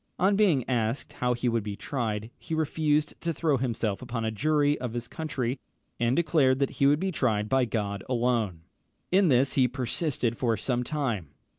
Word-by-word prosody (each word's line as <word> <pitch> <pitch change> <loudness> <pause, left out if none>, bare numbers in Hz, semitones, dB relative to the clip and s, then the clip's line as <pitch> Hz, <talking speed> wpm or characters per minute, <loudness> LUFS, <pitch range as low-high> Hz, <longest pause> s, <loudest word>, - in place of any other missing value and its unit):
On 195 +3 +3
being 180 - +3
asked 120 +1 -1
how 125 0 0
he 120 +1 -2
would 115 -1 +1
be 105 -1 -5
tried, 110 -3 -3
he 160 - -4
refused 155 -1 +1
to 170 - -1
throw 155 -3 +1
himself 115 -5 -2
upon 120 -2 -3
a 110 - 0
jury 145 +5 +2
of 125 -3 -4
his 120 0 -4
country, 135 -6 -3 0.4
and 120 +2 +2
declared 150 -6 +3
that 140 0 0
he 140 - +2
would 145 +1 +4
be 190 +1 -1
tried 110 - 0
by 130 +2 +2
God 100 -4 -3
alone. 115 -8 0 0.5
In 190 +1 +5
this 130 -1 +3
he 130 -2 +4
persisted 125 -1 -2
for 115 -3 +1
some 125 -2 -1
time. 120 - -3
125 Hz, 185 wpm, -27 LUFS, 115-150 Hz, 0.5 s, In